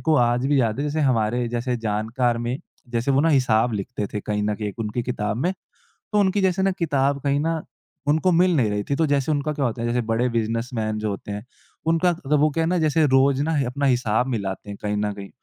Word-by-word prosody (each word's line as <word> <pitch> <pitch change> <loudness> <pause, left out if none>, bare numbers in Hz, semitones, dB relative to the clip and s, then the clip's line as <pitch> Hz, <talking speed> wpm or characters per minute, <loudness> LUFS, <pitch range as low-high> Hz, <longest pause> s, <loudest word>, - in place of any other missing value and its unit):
को 160 - +2
आज 120 0 +2
भी 140 -1 +3
याद 115 -1 0
है, - - -1
जैसे 150 +1 -1
हमारे 120 -3 +1
जैसे 120 +1 -1
जानकार 115 +2 -1
में 120 +3 -2 0.3
जैसे 120 +3 0
वो 135 0 +4
ना 165 - +3
हिसाब 125 -5 +3
लिखते 105 +1 -3
थे 105 - -2
कहीं 105 0 -2
न 105 0 0
कहीं 105 -1 -4
उनकी 115 +2 -2
किताब 105 -3 -2
में। 170 +9 0 0.6
तो 210 - +3
उनकी 200 0 +2
जैसे 190 -1 +1
ना 195 - +3
किताब 140 -4 +1
कहीं 140 0 +1
ना, 165 0 -1 0.4
उनको 160 +5 +3
मिल 180 +1 +4
नहीं 115 -7 +2
रही 105 0 -1
थी। - - +3
तो 160 +1 +2
जैसे 140 0 +1
उनका 150 +1 0
क्या 145 -2 -2
होता 115 -2 -2
है, 120 - -1
जैसे 120 +1 +1
बड़े 115 +2 +1
बिज़नेसमैन 115 -1 -2
जो 105 0 -2
होते 100 +1 -6
हैं, 105 +1 -6 0.4
उनका 165 +2 +3
मतलब 165 -5 -6
तो 150 - +4
वो 155 +2 +3
क्या 165 +3 -1
है - - 0
ना 180 +1 +1
जैसे 155 0 +2
रोज़ 135 0 +3
ना, 160 +2 0
अपना 140 +3 -1
हिसाब 125 -2 +2
मिलाते 105 -6 -3
हैं 100 - -6
कहीं 105 0 -1
न 105 0 -1
कहीं। 100 -1 -9
125 Hz, 245 wpm, -23 LUFS, 110-150 Hz, 0.6 s, वो